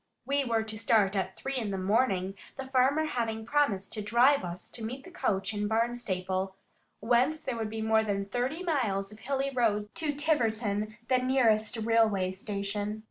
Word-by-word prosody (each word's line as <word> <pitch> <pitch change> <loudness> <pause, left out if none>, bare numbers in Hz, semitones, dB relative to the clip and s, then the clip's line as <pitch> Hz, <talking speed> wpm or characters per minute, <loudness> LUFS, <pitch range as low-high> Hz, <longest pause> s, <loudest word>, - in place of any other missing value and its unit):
We 280 +1 +1
were 230 -3 +1
to 215 -1 -7
start 210 -3 +3
at 190 -1 -2
three 270 0 -3
in 225 -4 -2
the 195 - -2
morning, 195 -1 +1 0.2
the 270 - -5
farmer 265 +4 +2
having 225 -6 -2
promised 230 -8 +1
to 215 - -3
drive 245 +7 +4
us 175 0 -6
to 230 - -8
meet 255 +5 -5
the 365 - -12
coach 195 - -1
in 205 0 -1
Barnstaple, 195 -5 -1 0.5
whence 250 +7 +2
there 260 - -2
would 220 -2 -3
be 220 0 -4
more 220 0 +3
than 200 -2 -1
thirty 250 - -2
miles 215 - 0
of 210 - -13
hilly 275 +2 -1
road 210 -5 0
to 320 -3 -1
Tiverton, 220 -8 0
the 255 -1 +3
nearest 235 -4 +2
railway 220 -4 +2
station. 205 +2 -3
220 Hz, 180 wpm, -29 LUFS, 205-260 Hz, 0.5 s, drive